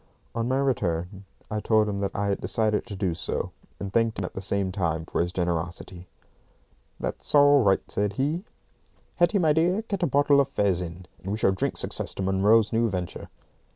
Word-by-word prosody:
On 115 Hz, 0 st, -1 dB
my 130 Hz, +1 st, +1 dB
return, 100 Hz, -8 st, -1 dB, 0.3 s
I 105 Hz, -, -1 dB
told 110 Hz, 0 st, +2 dB
him 100 Hz, -1 st, -2 dB
that 100 Hz, -1 st, -3 dB
I 100 Hz, 0 st, 0 dB
had 100 Hz, -, -1 dB
decided 110 Hz, 0 st, +1 dB
to 105 Hz, -, -6 dB
do 95 Hz, -3 st, -1 dB
so, 80 Hz, -, -3 dB, 0.3 s
and 100 Hz, -1 st, -5 dB
thanked 115 Hz, -1 st, +2 dB
him 95 Hz, -, -2 dB
at -, -, -7 dB
the 95 Hz, -, -5 dB
same 100 Hz, 0 st, -1 dB
time 85 Hz, -4 st, -1 dB
for -, -, -1 dB
his 85 Hz, +1 st, -1 dB
generosity. 85 Hz, 0 st, -3 dB, 0.9 s
"That's -, -, -2 dB
all 145 Hz, -1 st, +7 dB
right," 95 Hz, -4 st, +3 dB
said 100 Hz, 0 st, -1 dB
he. 150 Hz, -, -1 dB, 0.7 s
"Hetty, 175 Hz, +3 st, +3 dB
my 160 Hz, -5 st, +3 dB
dear, 175 Hz, +7 st, +2 dB
get 200 Hz, -4 st, -4 dB
a 175 Hz, -, +2 dB
bottle 140 Hz, 0 st, +4 dB
of 135 Hz, -, 0 dB
fez 100 Hz, -9 st, +1 dB
in, 90 Hz, +1 st, -7 dB, 0.2 s
and 95 Hz, -, -5 dB
we 105 Hz, -, -1 dB
shall 105 Hz, -, +3 dB
drink 95 Hz, -, -2 dB
success -, -, -2 dB
to 95 Hz, -, -3 dB
Munro's 100 Hz, +4 st, +3 dB
new 115 Hz, 0 st, +2 dB
venture." 90 Hz, -3 st, -5 dB
100 Hz, 200 wpm, -26 LUFS, 95-130 Hz, 0.9 s, all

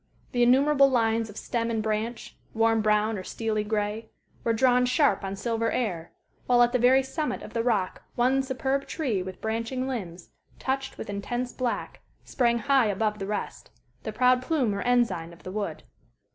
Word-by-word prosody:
The 245 Hz, -, 0 dB
innumerable 275 Hz, +3 st, +5 dB
lines 225 Hz, -3 st, +1 dB
of 205 Hz, -, -11 dB
stem 235 Hz, -2 st, -2 dB
and 225 Hz, -2 st, -1 dB
branch, 220 Hz, +2 st, -3 dB, 0.2 s
warm 225 Hz, 0 st, +3 dB
brown 215 Hz, 0 st, +2 dB
or -, -, -7 dB
steely 215 Hz, +1 st, -2 dB
gray, 210 Hz, +1 st, -2 dB, 0.3 s
were 230 Hz, -, +1 dB
drawn 250 Hz, +2 st, +3 dB
sharp 250 Hz, -6 st, +2 dB
on 195 Hz, 0 st, -3 dB
silver 230 Hz, +2 st, -1 dB
air, 180 Hz, -9 st, -2 dB, 0.4 s
while 245 Hz, -1 st, +5 dB
at 240 Hz, -, +2 dB
the 250 Hz, -, +1 dB
very 260 Hz, +3 st, +5 dB
summit 300 Hz, +3 st, -3 dB
of -, -, -10 dB
the 230 Hz, -, 0 dB
rock 215 Hz, -6 st, 0 dB
one 255 Hz, +3 st, +3 dB
superb 265 Hz, +1 st, -2 dB
tree 250 Hz, -, -1 dB
with 185 Hz, 0 st, -8 dB
branching 230 Hz, +4 st, -2 dB
limbs, 185 Hz, -9 st, -6 dB, 0.3 s
touched 270 Hz, 0 st, -3 dB
with -, -, -6 dB
intense 240 Hz, +5 st, -3 dB
black, 250 Hz, -2 st, -3 dB, 0.2 s
sprang 235 Hz, -3 st, +1 dB
high 270 Hz, -1 st, +3 dB
above 210 Hz, +1 st, -1 dB
the 195 Hz, -, -4 dB
rest, 210 Hz, 0 st, -4 dB, 0.3 s
the 220 Hz, -, -5 dB
proud 250 Hz, +3 st, +3 dB
plume 255 Hz, -6 st, 0 dB
or 200 Hz, -, -3 dB
ensign 215 Hz, -9 st, +1 dB
of 170 Hz, -, -17 dB
the 185 Hz, -, -6 dB
wood. 200 Hz, -6 st, -4 dB
230 Hz, 180 wpm, -27 LUFS, 210-255 Hz, 0.4 s, innumerable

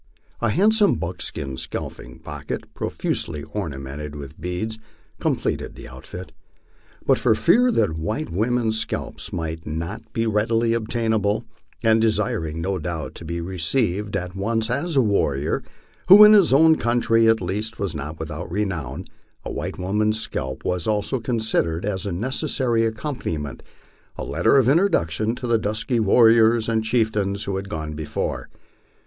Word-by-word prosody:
A 120 Hz, -, +2 dB
handsome 210 Hz, -, +4 dB
buckskin 70 Hz, -6 st, -4 dB
seal -, -, -4 dB
ping -, -, -12 dB
pocket, -, -, -6 dB
profusely 75 Hz, -3 st, -2 dB
ornamented 75 Hz, -6 st, -5 dB
witli 70 Hz, -1 st, -8 dB
beads, 90 Hz, +6 st, -3 dB, 0.4 s
com -, -, +1 dB
pleted -, -, -3 dB
the -, -, -10 dB
outfit. 75 Hz, +8 st, -9 dB, 0.7 s
But -, -, +3 dB
for 110 Hz, -, +3 dB
fear 235 Hz, -, +4 dB
that 80 Hz, -, +1 dB
white 110 Hz, -, -3 dB
women's 110 Hz, +3 st, +1 dB
scalps -, -, -3 dB
might 80 Hz, -1 st, -4 dB
not 85 Hz, +7 st, -5 dB
be 115 Hz, 0 st, -1 dB
readily 115 Hz, +2 st, +1 dB
obtainable, 110 Hz, -2 st, 0 dB, 0.4 s
and 110 Hz, 0 st, +4 dB
desiring 100 Hz, -8 st, 0 dB
no 95 Hz, +2 st, -1 dB
doubt 80 Hz, -1 st, -4 dB
to 85 Hz, -, -9 dB
be 85 Hz, +1 st, -3 dB
received 95 Hz, +3 st, -1 dB
at 90 Hz, -1 st, -5 dB
once 110 Hz, +3 st, -1 dB
as 155 Hz, +6 st, -1 dB
a 135 Hz, -, +5 dB
warrior, 75 Hz, -9 st, 0 dB, 0.5 s
who 200 Hz, +3 st, +10 dB
in 210 Hz, 0 st, +9 dB
his 200 Hz, -8 st, +6 dB
o\vn 160 Hz, +3 st, +6 dB
country 115 Hz, -1 st, +3 dB
at 115 Hz, 0 st, +4 dB
least 105 Hz, +6 st, -3 dB
was 100 Hz, -5 st, -2 dB
not 75 Hz, +1 st, -6 dB
without 80 Hz, +2 st, -6 dB
renown, 90 Hz, -5 st, -3 dB, 0.4 s
a -, -, -4 dB
white -, -, -4 dB
woman's 105 Hz, +4 st, 0 dB
scalp 65 Hz, -10 st, -4 dB
was 90 Hz, -2 st, -1 dB
also 110 Hz, +5 st, 0 dB
considered 110 Hz, -8 st, 0 dB
as 100 Hz, -1 st, -2 dB
a -, -, -2 dB
necessary 120 Hz, -, 0 dB
accompaniment, 110 Hz, -, -4 dB, 0.6 s
a -, -, -4 dB
letter -, -, +2 dB
of 130 Hz, -3 st, +4 dB
introduction 120 Hz, -, +2 dB
to 125 Hz, -, -6 dB
the 115 Hz, -2 st, +2 dB
dusk} 110 Hz, +4 st, -3 dB
r 120 Hz, -, +3 dB
warriors 115 Hz, +1 st, +5 dB
and 110 Hz, -1 st, +1 dB
chieftains 110 Hz, -3 st, 0 dB
who 100 Hz, -, -3 dB
had 95 Hz, +1 st, -4 dB
gone 80 Hz, -2 st, -4 dB
before. 75 Hz, -1 st, -4 dB
105 Hz, 155 wpm, -23 LUFS, 85-115 Hz, 0.7 s, who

